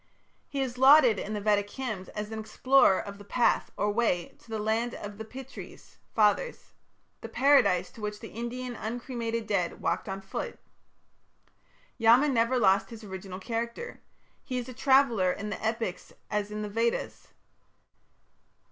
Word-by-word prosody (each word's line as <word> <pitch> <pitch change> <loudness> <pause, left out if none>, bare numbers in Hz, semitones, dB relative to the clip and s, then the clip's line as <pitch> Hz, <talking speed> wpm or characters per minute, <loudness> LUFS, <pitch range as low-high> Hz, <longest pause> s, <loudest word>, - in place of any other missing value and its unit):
He 280 -2 -2
is 250 -2 -3
lauded 265 -6 +7
in 210 - -4
the - - -2
Vedic 205 -1 +1
hymns 215 -7 -5
as 210 0 -5
the 220 - -4
explorer 220 -1 +4
of 200 0 -7
"the - - -10
path" 235 +4 +1
or 205 +1 +1
"way" 205 -6 0
to - - -22
the 220 - -3
"Land 220 +3 -1
of 205 0 -8
the - - -4
Pitris" 260 +4 -11 0.2
(Fathers), 220 - +1 0.5
the - - -7
Paradise 250 -9 +4
to 230 - -13
which 210 0 -4
the - - -9
Indian 240 +2 -5
uncremated 230 0 -4
dead 195 -5 -1
walked 170 +4 -1
on 195 0 -3
foot. 195 - -5 1.4
Yama 240 +6 +6
never 240 0 +2
lost 195 -3 +3
his 225 -1 -10
original 190 -2 -7
character. 235 - -4 0.4
He 255 -3 -4
is 245 0 -3
a 255 - -7
traveller 255 -7 +3
in 210 +2 -5
the - - -5
Epics 220 -4 -3 0.2
as 210 -1 -1
in 210 0 -4
the 210 - -4
Vedas. 230 +3 -1
220 Hz, 160 wpm, -28 LUFS, 205-245 Hz, 1.4 s, lauded